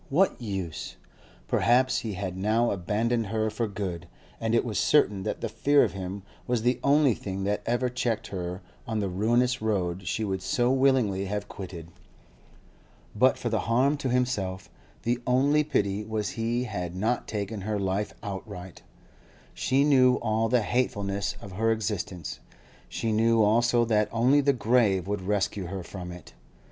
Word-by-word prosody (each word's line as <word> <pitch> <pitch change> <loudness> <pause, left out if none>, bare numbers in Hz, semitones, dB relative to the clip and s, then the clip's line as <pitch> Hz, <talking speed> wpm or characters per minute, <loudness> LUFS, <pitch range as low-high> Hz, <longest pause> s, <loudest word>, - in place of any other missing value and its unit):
what 175 0 +2
use? 95 -7 -4 0.5
Perhaps 130 +2 +3
he 115 -5 -4
had 95 -1 -4
now 110 +5 +1
abandoned 110 +5 0
her 110 +1 -1
for 115 +1 -1
good, 95 -4 -5 0.3
and 115 0 0
it 115 - +2
was 110 -4 -1
certain 105 -10 +3
that 105 +2 -3
the - - -1
fear 145 0 +3
of 100 - -1
him 95 +1 -5 0.2
was 120 -2 0
the 125 +1 +2
only 140 -2 +4
thing 95 -2 -5
that 100 +1 0
ever 120 +2 +1
checked 120 -3 -1
her 90 0 -5 0.2
on 110 -1 -2
the 100 -2 0
ruinous 120 +7 +1
road 95 -4 -1
she 110 +5 -1
would 95 -3 -2
so 125 +3 +1
willingly 130 -8 +2
have 105 +1 -3
quitted. 85 -4 -8 1.3
But - - +4
for - - -3
the - - 0
harm 130 +6 +2
to 140 -2 -2
himself, 105 -7 -1 0.3
the 120 +2 0
only 140 +4 +3
pity 105 -8 0
was 110 -1 -2
he 120 +1 -1
had 90 -7 -4
not 110 +6 -1
taken 105 0 -4
her 105 +2 -2
life 100 +1 -1
outright. 95 -2 -7 0.7
She 135 +2 +2
knew 130 -3 +5
all 110 -1 0
the 120 -1 +3
hatefulness 100 -5 -1
of 100 - -10
her 115 +4 +1
existence; 100 -6 -3 0.5
she 115 - -2
knew 115 +1 +3
also 120 +3 +3
that 105 -2 +2
only 125 +5 +4
the 140 0 +3
grave 110 -6 +2
would 105 -1 -2
rescue 100 -1 -1
her 95 +1 -5
from 90 0 -7
it. 90 -1 -11
110 Hz, 165 wpm, -27 LUFS, 95-120 Hz, 1.3 s, knew